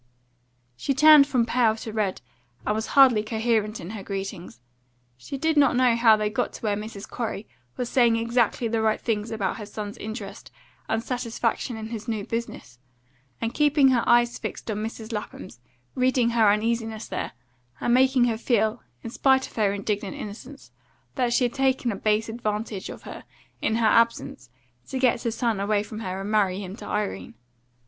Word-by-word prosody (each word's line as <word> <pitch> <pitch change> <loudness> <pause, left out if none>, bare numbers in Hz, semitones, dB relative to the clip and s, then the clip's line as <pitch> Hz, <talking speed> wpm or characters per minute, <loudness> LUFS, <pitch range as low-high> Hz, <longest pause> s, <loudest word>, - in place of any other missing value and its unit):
She 275 - -2
turned 300 0 +8
from 255 -5 +1
pale 230 -2 +2
to 220 -1 -7
red, 210 -4 -1 0.4
and 210 - +1
was 220 +1 -2
hardly 255 -6 +7
coherent 220 -1 -1
in 170 - -7
her 220 -2 -6
greetings; 195 - -6 0.6
she 125 - -7
did 320 +2 0
not 280 -3 +5
know 250 -2 +4
how 230 -2 +5
they 210 0 0
got 210 - -2
to - - -10
where 210 -2 +1
Mrs. 210 -1 -7
Corey 220 -3 -4 0.3
was 250 - -2
saying 240 -2 +3
exactly 235 +1 +1
the 225 0 0
right 220 -1 +1
things 220 -1 -2
about 215 -4 -2
her 210 - -7
son's 205 0 -7
interest 215 -2 -7 0.4
and 225 +1 0
satisfaction 235 -1 -2
in 220 0 -6
his 225 0 -6
new 215 -3 -2
business, 230 - -6 0.6
and 230 0 -2
keeping 295 -2 +4
her 250 -3 +3
eyes 240 0 +4
fixed - - -5
on 205 - -3
Mrs. 220 +1 -5
Lapham's, 195 - -7 0.3
reading 255 -2 +2
her 225 -3 +4
uneasiness 225 +1 -1
there, - - -4 0.5
and 240 - +1
making 260 0 +4
her 230 -2 +1
feel, 220 -3 +1 0.2
in 230 - -6
spite 265 +1 +3
of - - -14
her 210 -3 +2
indignant 200 0 -3
innocence, 215 - -9 0.4
that 245 -2 0
she 245 - +2
had 245 -1 0
taken 265 -2 +1
a - - -4
base 215 +2 +1
advantage 215 -3 -4
of - - -9
her - - -9 0.4
in 220 - +1
her 230 0 +1
absence 230 - +1 0.4
to 265 - -4
get 255 -2 +2
her 235 - -1
son 230 -2 -1
away 205 +1 +1
from 215 +1 -8
her 190 -3 -4
and 200 +2 -4
marry 200 -4 +2
him 190 -1 -7
to - - -10
Irene. 115 - -3
225 Hz, 185 wpm, -25 LUFS, 210-240 Hz, 0.6 s, turned